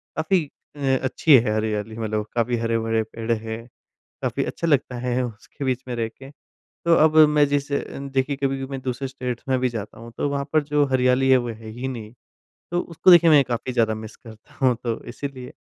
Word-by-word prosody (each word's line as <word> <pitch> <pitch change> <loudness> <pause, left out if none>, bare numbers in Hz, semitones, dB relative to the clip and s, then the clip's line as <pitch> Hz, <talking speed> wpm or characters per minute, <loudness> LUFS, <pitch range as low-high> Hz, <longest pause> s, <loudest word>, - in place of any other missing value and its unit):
काफ़ी 160 +1 +1 0.3
अ 135 -2 +1
अच्छी 135 +3 +4
है 115 -2 +1
हरियाली। 110 0 -2
मतलब 110 -1 -2
काफ़ी 120 +1 +1
हरे-भरे 115 -1 0
पेड़ 115 +1 -5
हैं, 110 0 -3 0.6
काफ़ी - - -1
अच्छा 170 - -3
लगता 135 -5 +1
है 125 +1 -1
उसके 120 +5 -8
बीच 130 -1 -1
में 125 - -3
रह 115 -1 -1
के। 135 +4 -14 0.6
तो 170 0 +5
अब 155 0 +4
मैं 150 -1 +4
जिस 145 0 -1
अ, 140 - +2 0.2
देखिए 135 0 -1
कभी-कभी 135 -1 -2
मैं 135 - -3
दूसरे 130 +1 -3
स्टेट्स 125 -2 -5
में 130 - +3
भी 125 0 +1
जाता 110 -2 -7
हूँ, 115 0 -10
तो 145 - 0
वहाँ 140 0 -2
पर 155 -1 +4
जो 145 0 +2
हरियाली 130 +1 +3
है, 130 - +7
वो 120 -1 -2
है 110 0 -8
ही 125 +4 -5
नहीं। 115 -4 -7 0.6
तो 175 - +1
उसको 175 +2 +2
देखिए 170 -1 +8
मैं 150 -2 +7
काफ़ी 120 +1 -3
ज़्यादा 115 -2 +2
मिस 110 0 -9
करता 110 -2 -15
हूँ। 125 -2 +5
तो 115 -1 -2
इसीलिए, 130 0 -7
125 Hz, 205 wpm, -23 LUFS, 115-140 Hz, 0.6 s, देखिए